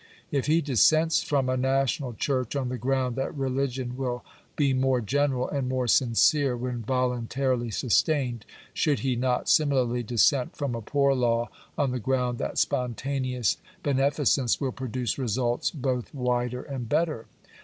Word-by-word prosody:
If 140 -1 0
he 160 +2 +3
dissents 155 +4 +3
from 140 -3 0
a 130 - +1
national 135 0 0
church 130 +1 -1
on 130 -3 -1
the 125 -1 -4
ground 130 -1 0
that 135 - -2
religion 130 -2 -2
will 125 -2 -3 0.3
be 140 -3 +2
more 130 0 +2
general 130 +2 0
and 135 -3 -2
more 130 -1 -1
sincere 130 +3 +3
when 125 -1 -3
voluntarily 125 0 -1
sustained, 125 +1 +1 0.3
should 150 -3 +1
he 130 -2 0
not 125 +1 0
similarly 130 -5 +2
dissent 125 +3 +2
from 140 -4 -2
a 115 - -4
poor 140 +4 +2
law 120 -2 +1 0.3
on 140 -3 +1
the 125 - -2
ground 125 0 -1
that - - -3
spontaneous 125 -1 0 0.3
bene 140 -1 +2
ficence 135 -4 +1
will 135 -3 -1
produce 125 -1 -3
results 120 0 0
both 130 -5 -3
wider 125 -1 -1
and 130 -5 -6
better 155 -9 0
130 Hz, 155 wpm, -26 LUFS, 125-135 Hz, 0.3 s, he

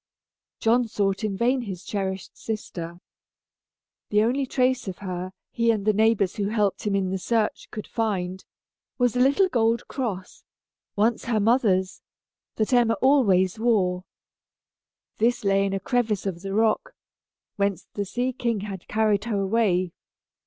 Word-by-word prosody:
John 235 +2 +3
sought 200 -2 -1
in 200 -3 -1
vain 250 +4 +2
for - - -7
his 185 -2 -6
cherished 190 -2 -4
sister. 175 -6 -6 1.1
The 210 0 +3
only 260 +4 0
trace 255 -2 +1
of 185 - -4
her, 185 -2 -5 0.2
he 230 0 +1
and 215 -3 +1
the 215 - +4
neighbors 215 -3 +2
who 200 -1 0
helped 210 -2 0
him 200 - +1
in 190 -1 0
the 190 - -2
search, 220 +2 -1
could 215 - -6
find, 190 -5 -2 0.5
was 245 -1 +2
a - - +1
little 280 +9 +4
gold 235 -7 +1
cross, 205 -9 -5 0.5
once 220 +3 +1
her 230 -2 +1
mother's, 200 -4 +2 0.5
that 220 +3 0
Emma 235 -2 +4
always 215 -8 +3
wore. 190 -6 +1 1.2
This 240 +2 +2
lay 195 0 +3
in 195 - -3
a 195 - -1
crevice 220 -1 0
of 180 -3 -3
the 195 0 -4
rock, 225 - +1 0.6
whence 200 -3 0
the 205 - -2
sea 245 +6 -2
king 235 -4 -1
had 195 -3 -7
carried 215 -1 +1
her 215 -4 -1
away. 190 -3 +1
210 Hz, 155 wpm, -25 LUFS, 195-235 Hz, 1.2 s, the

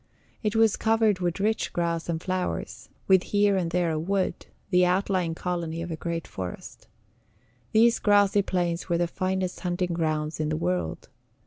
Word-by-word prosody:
It 210 -1 -1
was 225 -2 +4
covered 220 -3 +2
with 175 0 -1
rich 220 +2 0
grass 170 -1 -1
and 165 -1 -1
flowers, 185 +1 -3 0.2
with 190 -1 +6
here 205 +1 +2
and 180 -3 0
there 175 -1 +1
a 155 - -1
wood, 190 +3 -1 0.2
the 180 -1 +5
outlying 180 -2 +1
colony 170 -2 -3
of 170 - -6
a - - -2
great 165 0 -4
forest. 90 -2 -8 0.8
These 230 +2 +4
grassy 205 -1 +4
plains 175 -2 -2
were 170 - +2
the 175 - +2
finest 185 +1 -2
hunting 180 -1 -1
grounds 155 -2 -1
in 155 -1 0
the 155 - -1
world. 85 - -2
180 Hz, 165 wpm, -26 LUFS, 165-195 Hz, 0.8 s, with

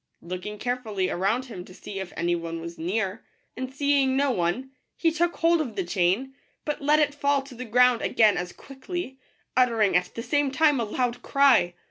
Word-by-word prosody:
Looking 185 +4 -6
carefully 215 -6 -2
around 210 +8 0
him 205 -8 -8
to 185 - -14
see 195 -1 -7
if 190 -2 -6
any 175 +1 +1
one 165 -1 -5
was 170 +1 -8
near, 195 +4 -2 0.3
and 260 0 -5
seeing 275 -1 +2
no 280 0 +2
one, 235 +7 -1 0.3
he 330 - +2
took 345 +2 0
hold 335 0 +3
of 245 -8 -5
the 190 - -1
chain, 190 +9 0 0.3
but 300 -1 -3
let 295 +2 +4
it 295 -1 +2
fall 285 -1 +1
to 270 -1 -12
the 250 +1 -7
ground 250 +1 +4
again 215 -3 +4
as 175 0 -3
quickly, 275 +1 -7 0.4
uttering 230 -6 +3
at 180 - +1
the 230 - -4
same 290 +1 +1
time 295 0 +3
a 230 - 0
loud 245 +2 -2
cry. 255 -11 +4
245 Hz, 195 wpm, -26 LUFS, 190-275 Hz, 0.4 s, let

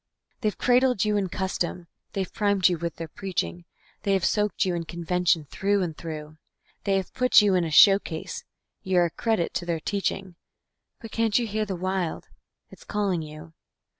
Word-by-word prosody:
They 215 - +1
have - - -9
cradled 250 -4 +3
you 210 0 +1
in 195 -3 0
custom, 180 -2 -2 0.3
they 195 - -1
have - - -11
primed 200 -3 +3
you 175 -3 0
with 170 -1 -3
their 165 - -6
preaching, 180 0 -4 0.4
They 200 - +1
have 190 -2 +2
soaked 210 -1 +1
you 185 - 0
in 170 -1 -3
convention 170 -1 0
through 200 0 +1
and 165 -3 -4
through; 155 -1 -7 0.5
They 195 -1 +2
have 190 - -4
put 250 -1 +5
you 205 -2 +3
in 180 -2 +3
a 165 - -2
showcase; 180 0 +4 0.4
you're 180 -2 +3
a 170 - -2
credit 220 0 0
to 175 - -2
their 170 -2 0
teaching 195 -1 -3 0.6
But 225 - -9
can't 225 -2 +2
you 240 - +1
hear 215 0 -1
the 195 -2 -3
Wild? 185 -1 -2 0.4
it's - - -14
calling 200 -5 -1
you. 155 +1 -10
185 Hz, 190 wpm, -26 LUFS, 170-205 Hz, 0.6 s, put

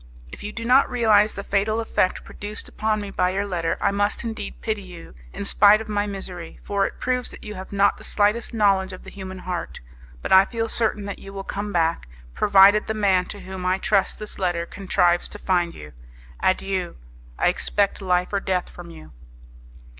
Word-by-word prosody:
If - - -10
you 210 - -5
do 230 +1 -6
not 255 +3 +5
realize 220 -4 +3
the 200 - -5
fatal 205 +3 0
effect 220 -4 0
produced 210 +1 -5
upon 215 0 -1
me 200 -1 -6
by 180 -1 +1
your 195 +2 -1
letter, 175 -4 -1
I 200 - +2
must 205 +1 0
indeed 225 -1 -6
pity 220 -2 -2
you, 180 - -12 0.2
in - - -6
spite 205 +1 +6
of 220 - -7
my 205 -1 -1
misery, 185 -4 -7
for 200 -1 0
it - - -11
proves 250 -1 -1
that - - -10
you 210 - -6
have 185 -1 -9
not 200 0 +3
the - - -13
slightest 210 +3 +1
knowledge 195 -4 +2
of 185 - -10
the - - -11
human 190 -1 -8
heart. 180 -2 -5 0.4
But - - -4
I 190 +1 +8
feel 225 0 -3
certain 215 -3 0
that 200 - -6
you 195 - -10
will 195 0 -6
come 205 +1 -4
back, 165 - 0 0.3
provided 200 - +5
the 220 - -2
man 190 -4 +2
to 205 - -8
whom 190 -1 -7
I 185 +1 +1
trust 195 0 +1
this 215 -1 -7
letter 175 -3 0
contrives 175 -2 +1
to - - -8
find 175 -4 0
you. 75 -1 -11 0.5
Adieu! 185 -1 0 0.4
I - - +3
expect 205 0 0
life 180 0 0
or 200 - +2
death 185 -2 -1
from 175 -1 -11
you." 160 -2 -13
200 Hz, 205 wpm, -23 LUFS, 185-210 Hz, 0.5 s, I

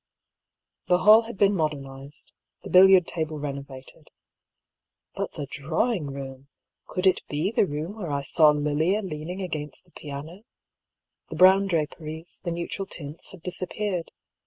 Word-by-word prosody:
The 180 - +4
hall 215 +5 +7
had 230 -2 -9
been 200 0 +4
modernised, 140 -3 -4 0.3
the - - -8
billiard 185 -1 +7
table 160 -3 -3
renovated. 140 -2 -8 1.0
But - - -4
the 145 - -5
drawing 155 - -1
room! 135 -1 -8 0.4
Could 185 0 -3
it 190 - +4
be 150 +7 -1
the 215 - +2
room 155 +8 -5
where 180 -7 -5
I 140 -1 -1
saw 155 +2 +5
Lilia 150 +7 +1
leaning 175 +2 -5
against 150 -3 -5
the 175 - -27
piano? 150 +6 -8 0.9
The - - -6
brown 190 +3 +6
draperies, 160 -1 -4
the 175 - -2
neutral 170 +3 -4
tints 150 -1 -7
had 185 -5 -14
disappeared. 185 0 -3
160 Hz, 140 wpm, -26 LUFS, 145-185 Hz, 1.0 s, hall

